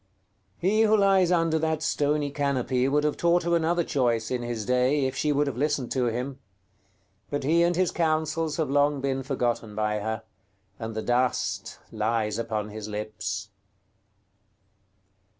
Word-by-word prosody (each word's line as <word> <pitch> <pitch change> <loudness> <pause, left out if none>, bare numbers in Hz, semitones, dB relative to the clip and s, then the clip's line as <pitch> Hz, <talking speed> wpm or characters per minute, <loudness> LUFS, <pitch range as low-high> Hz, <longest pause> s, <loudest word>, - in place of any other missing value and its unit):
§ - - -42 0.6
XVIII. 180 - +1
He 215 +1 +3
who 220 -1 +5
lies 195 -3 +4
under 165 -2 +2
that 160 0 -1
stony 145 -1 0
canopy 135 -3 0
would 145 +2 +2
have 150 -1 +1
taught 170 +1 +3
her 170 0 +2
another 170 +1 +1
choice, 120 -6 0
in 125 -1 -1
his 120 -3 -4
day, 130 +4 +2
if 130 - -2
she 150 - 0
would 145 +1 +2
have 140 -4 -4
listened 145 -3 -1
to 130 -2 +1
him; 125 +4 -3 0.9
but 145 - -2
he 165 +5 +3
and 170 0 +3
his 185 -1 +1
counsels 160 -1 0
have 155 -5 -1
long 145 0 +3
been 135 0 -1
forgotten 120 -5 -2
by 105 0 0
her, 110 +2 -3 0.6
and 110 -1 -5
the 110 - -3
dust 125 +1 0
lies 110 0 -1
upon 110 -2 -2
his 105 0 -7
lips. 105 -1 -4
135 Hz, 170 wpm, -26 LUFS, 115-160 Hz, 0.9 s, who